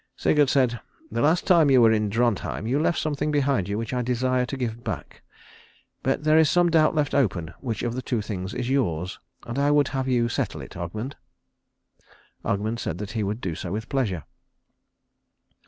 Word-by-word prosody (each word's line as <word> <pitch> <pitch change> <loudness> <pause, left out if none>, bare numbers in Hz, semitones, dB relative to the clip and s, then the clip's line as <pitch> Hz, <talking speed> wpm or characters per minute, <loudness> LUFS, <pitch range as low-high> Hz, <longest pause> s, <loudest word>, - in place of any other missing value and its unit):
Sigurd 145 -3 +3
said, 125 -4 +2 0.3
"The - - -1
last 160 +4 +3
time 165 -5 +5
you 130 -2 +6
were 115 -2 +6
in 105 -1 +1
Drontheim 115 -1 0
you 130 +5 +1
left 165 +2 +1
something 150 -1 -1
behind 140 -9 +1
you 100 - -1
which 115 +2 -4
I 125 - 0
desire 125 +1 0
to 135 - -4
give 120 -2 -4
back. - - -6 0.8
But 135 +2 0
there 155 +1 +5
is 160 -2 +5
some 175 -1 +3
doubt 160 -1 +4
left 150 -1 0
open 90 - 0
which 115 -5 -4
of 120 +1 -2
two 120 - -1
things 100 -2 -5
is 125 -1 -2
yours, 95 - -1 0.3
and 120 +3 -3
I 140 +1 +3
would 145 -1 +3
have 135 -1 -2
you 120 -2 +2
settle 115 - -2
it, - - -11
Ogmund." 110 +10 -5 1.3
Ogmund 110 +3 -1
said 85 - -3
that 105 +2 -6
he 115 -2 -2
would 105 +3 -2
do 90 -6 -2
so 85 +2 -6
with 110 +3 -4
pleasure. 105 - -1
125 Hz, 190 wpm, -25 LUFS, 105-140 Hz, 1.3 s, you